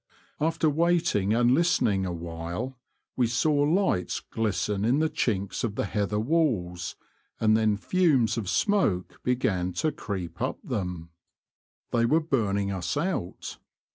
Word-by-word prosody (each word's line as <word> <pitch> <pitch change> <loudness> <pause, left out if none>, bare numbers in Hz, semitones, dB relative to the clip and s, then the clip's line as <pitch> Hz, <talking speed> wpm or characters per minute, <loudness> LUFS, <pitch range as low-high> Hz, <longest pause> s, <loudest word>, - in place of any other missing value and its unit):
After 160 +1 +1
waiting 160 - +2
and 120 +2 +4
listening 110 - +2
awhile 85 +9 -5 0.4
we 125 -2 +2
saw 135 +7 +1
lights 145 - +1
glisten 105 -2 -2
in 120 +5 +3
the 155 +1 +1
chinks 100 -4 -1
of 110 -4 -2
the - - -1
heather 105 +1 -1
walls, 110 - 0 0.4
and 110 -1 +4
then 110 -2 +2
fumes 145 - +2
of 110 -5 -3
smoke 185 - +1
began 95 -8 0
to 155 - 0
creep 90 - -6
up - - -1
them. 90 -4 -4 0.8
They 115 0 +2
were 155 +6 +4
burning 100 -10 0
us 95 +5 -2
out. 150 - -3
110 Hz, 135 wpm, -27 LUFS, 95-150 Hz, 0.8 s, and